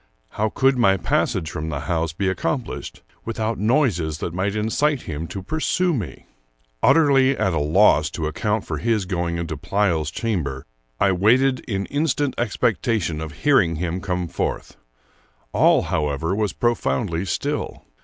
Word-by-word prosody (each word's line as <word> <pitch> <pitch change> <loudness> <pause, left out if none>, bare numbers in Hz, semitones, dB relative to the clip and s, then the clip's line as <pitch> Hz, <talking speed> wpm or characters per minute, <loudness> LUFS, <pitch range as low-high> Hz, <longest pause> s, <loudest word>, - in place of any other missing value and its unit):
How 110 +1 -1
could 135 +3 +2
my 95 -4 +4
passage 80 -2 0
from 80 -1 -4
the 70 -3 -3
house 80 +2 -1
be 95 +5 -2
accomplished 95 +6 -3 0.2
without 110 0 -2
noises 105 - +1
that 80 - -4
might 100 +3 -1
incite 125 +6 0
him 80 +1 -5
to 95 +2 -6
pursue 160 - 0
me? 110 - -5 0.6
Utterly 135 -4 +4
at 95 - +1
a 80 - +1
loss 75 -1 +4
to 80 - -2
account 105 +7 -1
for - - -3
his 110 -4 0
going 85 -2 -2
into 85 -1 -3
Pleyel's 85 0 0
chamber, 80 - -3 0.3
I 100 - +4
waited 125 +8 +3
in 100 -4 -2
instant 145 -2 0
expectation 105 -7 0
of 80 -1 -5
hearing 110 - +4
him 85 +2 -3
come 90 -2 -2
forth. - - -3 0.8
All, - - +4
however, 75 +4 -1
was 105 -2 0
profoundly 105 -4 0
still. 95 - -3
95 Hz, 150 wpm, -22 LUFS, 80-115 Hz, 0.8 s, my